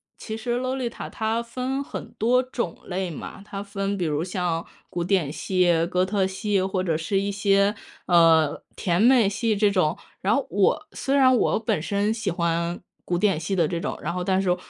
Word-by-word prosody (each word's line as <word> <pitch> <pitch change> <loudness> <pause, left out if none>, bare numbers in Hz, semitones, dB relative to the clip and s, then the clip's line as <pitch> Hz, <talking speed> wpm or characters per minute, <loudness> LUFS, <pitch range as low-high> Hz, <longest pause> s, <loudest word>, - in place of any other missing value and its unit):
其 220 0 -6
实 240 +1 -2
Lolita 255 -2 -3
它 220 +1 -1
分 255 +3 -3
很 - - -7
多 250 +4 +3
种 240 -8 -4
类 185 0 -3
嘛， 165 - -8
它 200 -1 -6
分 200 0 -3
比 180 - -1
如 150 0 0
像 180 -3 -2 0.3
古 175 - -2
典 170 -5 +1
系、 175 -2 +2
哥 180 0 +2
特 190 0 +1
系， 195 +1 0
或 190 0 -1
者 165 -3 0
是 165 +5 0
一 200 +1 -1
些， 200 0 +3 0.3
呃， 165 -4 +4
甜 175 0 0
美 240 -2 +6
系 215 +2 0
这 205 0 +3
种。 180 -6 +1 0.2
然 195 - +2
后 275 - 0
我 205 +11 +2
虽 275 - -1
然 260 -2 +6
我 230 - +2
本 210 -8 -1
身 200 +4 0
喜 225 -2 -2
欢 170 0 -1 0.2
古 175 - -1
典 190 -3 +2
系 180 +4 -2
的 170 -4 +2
这 170 0 -2
种， 210 - -3
然 - - -2
后 180 0 -2
但 190 +1 +2
是， 185 -2 +2
195 Hz, 235 characters per minute, -24 LUFS, 175-220 Hz, 0.3 s, 美